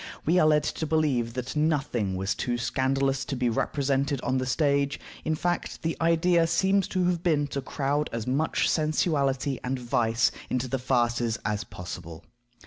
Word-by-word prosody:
We 175 +4 +4
are 155 - +5
led 150 -1 +4
to 160 - -3
believe 140 -7 +1
that 130 +2 -4
nothing 140 -10 0
was 95 +1 -1
too 120 -1 -2
scandalous 135 +2 0
to 135 - -3
be 125 -1 +1
represented 140 +2 0
on 130 +1 0
the 130 - -2
stage; 140 +1 +1 0.2
in 155 - 0
fact, 175 +3 -2
the 165 0 -1
idea 165 +1 +3
seems 195 +3 +2
to 185 -1 0
have 175 -2 +1
been 155 -4 +2
to 140 - -3
crowd 145 +2 -1
as 115 -1 -3
much 140 +5 +1
sensuality 145 -4 +1
and 130 +1 -1
vice 120 0 +1 0.2
into 125 0 -1
the 135 +1 -2
farces 120 -2 +1
as 105 -1 -1
possible. 85 -2 -8
135 Hz, 170 wpm, -27 LUFS, 125-155 Hz, 0.2 s, are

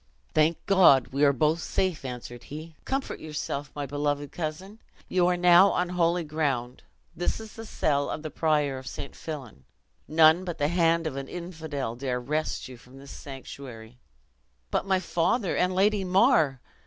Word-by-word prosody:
"Thank 155 +2 +2
God, 180 -10 +5
we 140 +2 0
are 140 - +6
both 155 +5 +1
safe," 185 -3 -1
answered 120 -2 -7
he; 155 +2 -9
"comfort 270 +1 -3
yourself, 150 -2 -5
my 145 -1 -3
beloved 145 0 -2
cousin! 180 +6 -5 0.3
you 180 -1 +2
are 180 0 +2
now 180 +2 +7
on 180 0 0
holy 175 -1 +1
ground; 140 -6 -2 0.3
this 175 +5 -1
is 220 -1 -10
the 225 -1 -9
cell 145 -7 0
of 155 - -4
the 155 - -5
prior 150 -4 +1
of 130 - -12
St. 140 - -7
Fillan. 130 - -8 0.4
None 160 +2 +5
but 175 -3 -5
the 145 0 +1
hand 170 -1 +2
of 140 -4 -3
an 135 0 -5
infidel 160 -8 -5
dare 125 0 -2
wrest 150 +5 -2
you 130 -1 -11
from 125 +2 -17
this 140 0 -12
sanctuary." 125 -4 -10 0.7
"But - - -1
my 190 -1 +3
father, 185 +4 0
and 180 0 +1
Lady 200 +1 +3
Mar?" 180 - +3
155 Hz, 170 wpm, -27 LUFS, 140-175 Hz, 0.7 s, now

